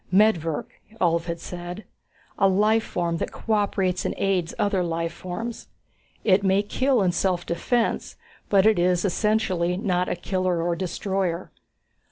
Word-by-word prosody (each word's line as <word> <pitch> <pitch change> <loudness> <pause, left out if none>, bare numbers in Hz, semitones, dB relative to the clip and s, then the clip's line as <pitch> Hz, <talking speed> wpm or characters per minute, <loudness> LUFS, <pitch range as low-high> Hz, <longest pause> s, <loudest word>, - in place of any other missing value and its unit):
Medvirk, 180 -6 +3 0.3
Ulv 170 -3 +2
had 170 -1 -4
said. 175 +3 -7 0.6
A 195 - +5
life 210 +4 +3
form 170 -4 -2
that - - -3
cooperates 200 -4 0
and - - -2
aids 185 -4 0
other 200 -2 +1
life 165 -1 -2
forms. 220 +7 -6 0.6
It 200 -1 +4
may 195 +1 +3
kill 255 +2 +1
in 180 - +3
self 175 -1 0
defense, 230 +7 -1 0.3
but 195 -1 +4
it 215 -4 +4
is 180 +1 +2
essentially 190 -3 +1
not 180 -3 0
a - - 0
killer 185 0 -1
or 170 +1 0
destroyer. 185 0 -2
185 Hz, 145 wpm, -24 LUFS, 175-205 Hz, 0.6 s, A